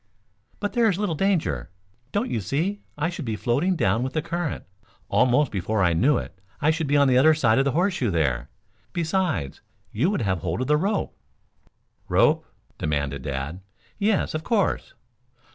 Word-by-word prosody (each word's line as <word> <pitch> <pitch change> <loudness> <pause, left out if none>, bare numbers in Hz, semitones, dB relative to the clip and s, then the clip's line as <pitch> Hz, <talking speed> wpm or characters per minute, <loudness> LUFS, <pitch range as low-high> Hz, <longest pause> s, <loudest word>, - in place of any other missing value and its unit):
"But 205 - -2
there 235 -2 +4
is 185 - 0
little 205 -4 -1
danger. 150 - 0 0.4
Don't 235 +5 -1
you 115 - -1
see 165 - -1 0.2
I 150 +2 0
should 175 -3 -6
be 115 -4 -2
floating 140 - +1
down 110 - +1
with 130 +1 -3
the 155 - 0
current. 170 -3 -3 0.5
Almost 125 +2 +3
before 100 +1 0
I 85 -2 +3
knew 125 - +3
it 95 +2 -7 0.2
I 150 +2 +3
should 160 -1 -2
be 145 +1 +3
on 140 -1 +5
the 130 -1 +5
other 155 +3 +6
side 120 -6 +3
of 135 - +2
the 140 - +1
horseshoe 175 - +1
there. 70 -9 0 0.4
Besides 165 - -1 0.3
you 135 - +1
would 200 - -1
have 95 -3 0
hold - - -2
of - - 0
the 150 - +3
rope." 195 +5 -1 0.9
"Rope?" - - +3 0.3
demanded 70 -2 -1
Dad. 70 +5 -4 0.4
"Yes, 205 0 +1
of 155 0 -3
course." 230 - 0
140 Hz, 180 wpm, -24 LUFS, -, 0.9 s, other